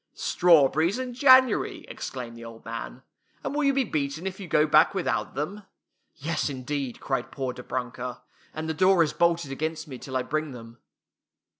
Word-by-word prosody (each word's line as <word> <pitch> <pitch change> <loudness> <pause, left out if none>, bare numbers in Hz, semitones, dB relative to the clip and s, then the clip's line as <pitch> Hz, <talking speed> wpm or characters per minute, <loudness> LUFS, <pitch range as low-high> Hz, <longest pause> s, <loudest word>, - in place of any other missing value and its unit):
"Strawberries 165 - +4
in 255 -1 -4
January!" 260 -2 +4
exclaimed 120 -3 -6
the 115 - -10
old 115 -1 -11
man. 115 - -6 0.2
" - - -38
And - - -3
will 300 +1 0
you 275 - +4
be 270 0 +2
beaten 150 - -3
if 190 0 -4
you 190 - -7
go 150 -1 +3
back 155 +5 +5
without 120 - -1
them? 180 +9 -3 0.3
" - - -49
"Yes, 155 +1 -2
indeed!" 135 -1 -4
cried 135 - -2
poor 130 -3 -3
Dobrunka, 125 0 -5 0.2
" - - -31
and 155 +1 -4
the 160 - -1
door 185 +1 +5
is 155 - -2
bolted 170 -4 +1
against 155 +3 -3
me 130 -4 -8
till 130 -2 -4
I 130 - -1
bring 155 0 -2
them." 115 0 -11
150 Hz, 190 wpm, -26 LUFS, 130-175 Hz, 0.3 s, back